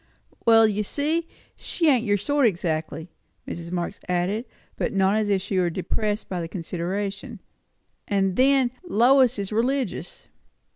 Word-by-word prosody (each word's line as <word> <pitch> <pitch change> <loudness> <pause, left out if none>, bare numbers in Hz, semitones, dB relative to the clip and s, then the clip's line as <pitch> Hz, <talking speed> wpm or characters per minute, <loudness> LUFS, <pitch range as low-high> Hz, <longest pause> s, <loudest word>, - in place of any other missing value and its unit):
"Well, 225 -1 +7
you 210 0 -1
see, 305 +9 -1 0.3
she 330 - -2
ain't 255 -6 +4
your 205 -3 +2
sort 285 +5 +2
exactly," 160 -3 -3 0.4
Mrs. 170 0 -6
Marx 180 +2 -3
added, 180 +6 0 0.3
but - - -2
not 195 +1 +2
as 215 -1 0
if 195 -2 +1
she 195 -1 -1
were 175 -1 +2
depressed 210 +4 -2
by 180 -2 -3
the 165 - -4
consideration. 195 +6 -4 0.7
"And 195 -2 +1
then, 265 0 +3
Lois 255 - +4
is 200 0 -4
religious." 260 - -2
205 Hz, 145 wpm, -24 LUFS, 185-245 Hz, 0.7 s, Well